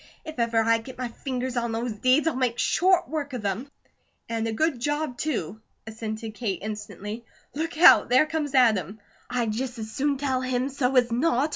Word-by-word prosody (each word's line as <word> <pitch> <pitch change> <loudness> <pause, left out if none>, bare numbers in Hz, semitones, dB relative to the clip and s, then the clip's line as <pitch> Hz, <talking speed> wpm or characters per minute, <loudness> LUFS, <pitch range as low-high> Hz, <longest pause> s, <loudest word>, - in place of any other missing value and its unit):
If 315 -5 -8
ever 230 -1 +2
I 230 0 +3
get 250 +3 -11
my 250 -1 -3
fingers 255 +1 -4
on 235 -1 -1
those 230 +2 -2
deeds, 255 +8 +2
I'll 320 - +1
make 250 -2 0
short 365 +5 +3
work 290 -3 -4
of 245 -4 -4
them!" 205 +8 -2 0.6
"And 225 -1 -2
a - - -1
good 285 +3 0
job, 295 +1 -1
too!" 220 - -3 0.2
assented 220 0 -6
Kate, 215 -5 -2
instantly. 210 +1 -6 0.3
"Look 320 +2 -3
out! 340 - +7
There 255 +5 +5
comes 300 -3 -3
Adam." 220 -5 +3 0.3
"I'd 240 -3 0
just 250 +2 -3
as 220 -1 -6
soon 285 +2 0
tell 265 -2 -1
him 255 +1 -1
so 270 -1 -1
as 245 -2 +4
not!" 275 +3 +2
245 Hz, 190 wpm, -26 LUFS, 225-280 Hz, 0.6 s, out